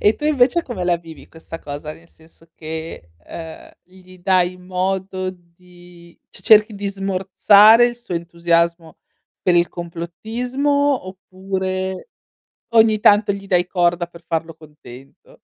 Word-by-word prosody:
E 210 Hz, -, +3 dB
tu 295 Hz, -, -8 dB
invece 300 Hz, +2 st, +2 dB
come 195 Hz, -, -5 dB
la 175 Hz, -1 st, +2 dB
vivi 165 Hz, -2 st, -14 dB
questa 165 Hz, 0 st, -10 dB
cosa? 145 Hz, +1 st, -7 dB
Nel 170 Hz, +1 st, -18 dB
senso 165 Hz, 0 st, -23 dB
che, 160 Hz, -, -8 dB, 0.2 s
ehm, 160 Hz, -1 st, -10 dB
gli 185 Hz, 0 st, -18 dB
dai 180 Hz, 0 st, +1 dB
modo 185 Hz, +1 st, -3 dB
di 175 Hz, -1 st, -19 dB
c -, -, -14 dB
cerchi 215 Hz, 0 st, +5 dB
di 200 Hz, 0 st, -5 dB
smorzare 195 Hz, +4 st, +5 dB
il 240 Hz, 0 st, -4 dB
suo 235 Hz, -7 st, -7 dB
entusiasmo 170 Hz, -1 st, -1 dB, 0.5 s
per 180 Hz, -3 st, +2 dB
il 175 Hz, 0 st, +3 dB
complottismo 240 Hz, +11 st, -2 dB
oppure 190 Hz, -, -5 dB, 0.7 s
ogni 220 Hz, -1 st, +4 dB
tanto 205 Hz, 0 st, +4 dB
gli 195 Hz, 0 st, -7 dB
dai 180 Hz, -2 st, +2 dB
corda 175 Hz, -1 st, 0 dB
per 170 Hz, 0 st, -16 dB
farlo 165 Hz, 0 st, -3 dB
contento? 140 Hz, -4 st, -16 dB
180 Hz, 135 wpm, -19 LUFS, 170-200 Hz, 0.7 s, cerchi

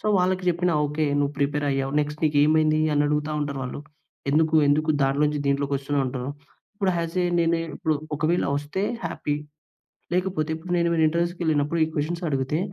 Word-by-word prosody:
So, -, -, -25 dB
వాళ్ళకి 185 Hz, +1 st, +1 dB
చెప్పినా 175 Hz, 0 st, +1 dB
okay. 150 Hz, +2 st, -1 dB, 0.2 s
నువ్వు 145 Hz, 0 st, 0 dB
ప్రిపేర్ 145 Hz, +1 st, 0 dB
అయ్యావు. 135 Hz, 0 st, -1 dB
నెక్స్ట్ 150 Hz, 0 st, -2 dB
"నీకేమైంది?" 155 Hz, +1 st, +3 dB
అని 145 Hz, 0 st, +3 dB
అడుగుతా 150 Hz, +1 st, 0 dB
ఉంటారు 140 Hz, -1 st, -3 dB
వాళ్ళు. 125 Hz, +3 st, -5 dB, 0.5 s
"ఎందుకు, 160 Hz, +2 st, +2 dB
ఎందుకు 155 Hz, +2 st, +2 dB
దాంట్లో 135 Hz, +2 st, +2 dB
నుంచి 150 Hz, 0 st, -1 dB
దీంట్లోకి 140 Hz, 0 st, +1 dB
వస్తూనావు?" 140 Hz, 0 st, -1 dB
అంటారు. 130 Hz, +1 st, -4 dB, 0.4 s
ఇప్పుడు 195 Hz, -2 st, 0 dB
హౌసే 170 Hz, +2 st, -1 dB, 0.2 s
నేను 170 Hz, 0 st, +2 dB, 0.2 s
ఇప్పుడు 160 Hz, -3 st, 0 dB, 0.2 s
ఒకవేళ 155 Hz, +4 st, +1 dB
వస్తే 145 Hz, +6 st, -3 dB, 0.2 s
హ్యాపీ. 145 Hz, -, -2 dB, 0.8 s
లేకపోతే 180 Hz, -4 st, 0 dB
ఇప్పుడు 165 Hz, +3 st, -8 dB
నేను 170 Hz, 0 st, +2 dB, 0.2 s
ఇంటర్‌వ్యూస్‌కి 170 Hz, +2 st, -1 dB
వెళ్ళినప్పుడు 155 Hz, 0 st, +1 dB
ఈ -, -, -5 dB
క్వశ్చన్స్ 165 Hz, +4 st, -2 dB
అడగితే, 135 Hz, +2 st, -1 dB
150 Hz, 165 wpm, -24 LUFS, 145-170 Hz, 0.8 s, నీకేమైంది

